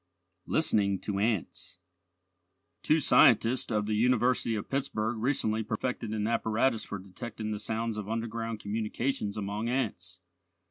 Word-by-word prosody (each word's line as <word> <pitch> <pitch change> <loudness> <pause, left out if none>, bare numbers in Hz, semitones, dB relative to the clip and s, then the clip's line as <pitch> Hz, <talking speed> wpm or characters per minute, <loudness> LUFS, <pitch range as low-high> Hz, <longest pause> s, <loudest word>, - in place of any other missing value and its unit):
LISTENING 100 -11 +2
TO 100 +1 -3
ANTS 105 -4 -1 1.0
Two 155 - +3
scientists 120 -3 +5
of 105 -1 +1
the 110 - -1
University 120 +1 +2
of 105 - -4
Pittsburgh 120 -5 -1
recently 110 -3 +1
perfected 115 +1 -3
an 105 -1 -1
apparatus 115 +1 +1
for 100 - -5
detecting 105 +3 -6
the 105 - -3
sounds 110 +1 -2
of 105 -1 -5
underground 115 0 -3
communications 110 +1 -2
among 105 +3 -2
ants. 100 -8 -2
110 Hz, 130 wpm, -30 LUFS, 105-120 Hz, 1.0 s, scientists